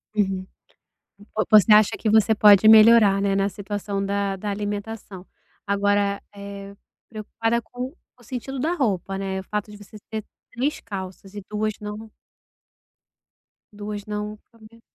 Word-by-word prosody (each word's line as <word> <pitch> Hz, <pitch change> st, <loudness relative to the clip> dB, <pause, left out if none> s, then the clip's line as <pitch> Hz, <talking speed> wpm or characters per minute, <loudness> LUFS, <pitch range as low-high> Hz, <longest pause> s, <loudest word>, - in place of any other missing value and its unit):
Uhum, 195 Hz, -3 st, 0 dB, 0.7 s
vo 210 Hz, +1 st, -4 dB
você 215 Hz, 0 st, +6 dB
acha 210 Hz, -1 st, +6 dB
que 220 Hz, -, -1 dB
você 220 Hz, +1 st, +4 dB
pode 210 Hz, 0 st, +6 dB
melhorar, 220 Hz, -2 st, +7 dB
né, 200 Hz, -1 st, +1 dB
na 195 Hz, 0 st, +1 dB
situação 200 Hz, 0 st, -4 dB
da 200 Hz, 0 st, -1 dB
da 205 Hz, +2 st, -5 dB
alimentação. 205 Hz, -1 st, -5 dB, 0.4 s
Agora, 200 Hz, 0 st, +1 dB
eh, 200 Hz, 0 st, -9 dB, 0.3 s
preocupada 225 Hz, +1 st, -2 dB
com 245 Hz, +4 st, -7 dB, 0.3 s
o -, -, -19 dB
sentido 255 Hz, +3 st, -6 dB
da 315 Hz, +6 st, 0 dB
roupa, 195 Hz, -, -1 dB
né, 190 Hz, -1 st, -3 dB
o -, -, -7 dB
fato 210 Hz, +2 st, -4 dB
de 210 Hz, -, -11 dB
você 205 Hz, +1 st, -15 dB
ter 220 Hz, -1 st, -5 dB, 0.3 s
3 265 Hz, +5 st, -2 dB
calças 190 Hz, -2 st, -8 dB
e 205 Hz, -, -6 dB
2 215 Hz, 0 st, -1 dB
não 210 Hz, +1 st, -8 dB, 1.6 s
duas 205 Hz, 0 st, -6 dB
não 210 Hz, 0 st, -5 dB
caber. 230 Hz, 0 st, -18 dB
210 Hz, 145 wpm, -23 LUFS, 200-220 Hz, 1.6 s, melhorar